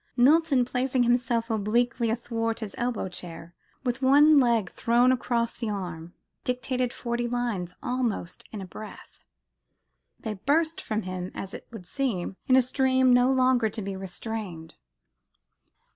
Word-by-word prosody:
Milton, 280 0 +4
placing 255 +1 0
himself 240 -1 +1
obliquely 230 +2 +1
athwart 230 0 -2
his 210 -3 -5
elbow 240 -5 -1
chair, 170 -2 -8 0.3
with 245 +1 -2
one 290 +3 +6
leg 235 -7 +2
thrown 240 +2 +3
across 240 -2 0
the 230 -3 -3
arm, 175 -4 -5 0.3
dictated 250 0 -1
forty 240 0 -2
lines, 235 -8 -2
almost 240 -8 -2
in 210 - -6
a - - -6
breath, 215 +3 -11 1.0
they 220 - -4
burst 305 - 0
from 215 0 -2
him, 185 0 -4
as 195 0 -6
it - - -9
would 225 -6 -10
seem, 195 -5 -2
in 255 - +5
a 260 - +6
stream 260 0 +3
no 245 +1 +5
longer 255 -3 +3
to 215 +1 -5
be 195 0 -4
restrained. 190 -3 -6
235 Hz, 145 wpm, -27 LUFS, 205-255 Hz, 1.0 s, one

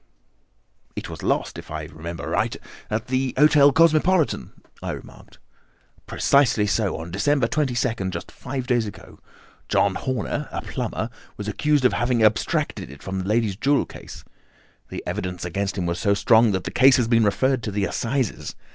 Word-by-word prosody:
"It - - -6
was - - -8
lost, - - -1
if - - -12
I 75 0 -4
remember 80 +3 -7
aright, - - -1 0.3
at 110 +1 -2
the 130 0 -1
Hotel 150 0 +6
Cosmopolitan," 165 +2 +3 0.3
I - - -3
remarked. - - -12 0.7
"Precisely 125 -6 +3
so, 105 -1 0
on 80 +1 -7
December 120 +7 +1
22nd, 120 -8 -1
just 85 -2 -6
five 130 -1 -5
days 120 -3 +1
ago. 105 - -11 0.5
John 100 - +3
Horner, 130 +1 -3
a - - -4
plumber, - - -4 0.3
was 105 - -6
accused 145 +5 +1
of 125 - +4
having 120 -2 +1
abstracted 105 - +1
it 70 +1 -12
from 95 0 -3
the 95 - -4
lady's 110 -2 +1
jewel 140 +7 +2
case. - - -11 0.7
The - - -6
evidence 90 -1 -4
against 100 +3 -2
him 90 - -1
was 85 0 -2
so 100 -2 +2
strong 115 +2 +5
that 95 -1 -1
the - - -5
case 130 +2 +6
has 120 -3 +1
been 115 -1 +4
referred 130 +5 +1
to 105 - -4
the 100 0 0
Assizes. 120 +1 -2
115 Hz, 170 wpm, -23 LUFS, 95-130 Hz, 0.7 s, Hotel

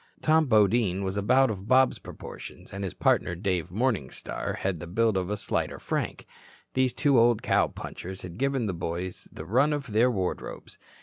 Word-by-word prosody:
Tom 155 -1 +4
Bodine 105 -3 +3
was 95 0 -2
about 125 +6 +3
of 100 -1 -7
Bob's 130 +1 +4
proportions, - - -10
and 100 0 -4
his 95 - -4
partner 85 - +2
Dave 90 -2 -1
Morningstar 100 - -2
had 95 -4 -2
the 85 - -7
build 110 +4 +1
of 95 -1 0
the 105 +1 -2
slighter 100 - -2
Frank. - - -3 0.5
These 130 -1 +2
two 140 -5 +4
old 120 -1 +4
cow - - +3
punchers 95 +1 -8
had 90 +2 -8
given 135 -3 +1
the 100 - -1
boys 85 +2 -5
the 80 - -8
run 130 - +3
of 140 -5 -4
their 115 +4 +4
wardrobes. 95 -7 -4
105 Hz, 180 wpm, -27 LUFS, 95-125 Hz, 0.5 s, Tom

